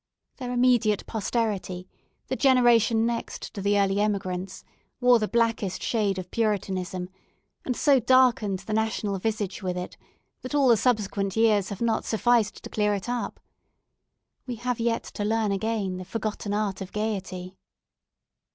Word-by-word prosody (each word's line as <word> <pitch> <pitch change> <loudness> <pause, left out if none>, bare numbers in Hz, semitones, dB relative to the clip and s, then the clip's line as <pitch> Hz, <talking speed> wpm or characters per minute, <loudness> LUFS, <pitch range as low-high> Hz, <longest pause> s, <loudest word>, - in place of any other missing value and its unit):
Their 250 -2 -5
immediate 245 -4 +3
posterity, 205 -5 -2 0.4
the - - -2
generation 240 -4 +4
next 235 0 -4
to 200 - -5
the 205 +1 +2
early 195 0 +2
emigrants, 190 -3 -2 0.4
wore 245 -1 +5
the 215 - 0
blackest 230 -5 0
shade 205 -4 0
of 185 -1 -6
Puritanism, 190 -4 -1 0.6
and 250 - -1
so 280 -1 +4
darkened 245 -5 +3
the 215 - -3
national 215 -2 -1
visage 210 -1 -2
with 180 -2 -2
it, 180 - -6 0.4
that 255 +3 -5
all 275 -3 +4
the 235 - +7
subsequent 205 -4 0
years 215 -4 +3
have 200 - -7
not 230 -2 +1
sufficed 230 -1 +1
to - - -7
clear 210 -1 +1
it 195 - -5
up. 245 -1 -3 1.1
We 245 - -3
have 245 +1 -3
yet 230 0 0
to 205 - -6
learn 220 0 +1
again 200 -2 -1
the 185 - -6
forgotten 215 0 -4
art 205 -2 -1
of 190 - -6
gaiety. 190 -4 -4
215 Hz, 150 wpm, -26 LUFS, 195-235 Hz, 1.1 s, the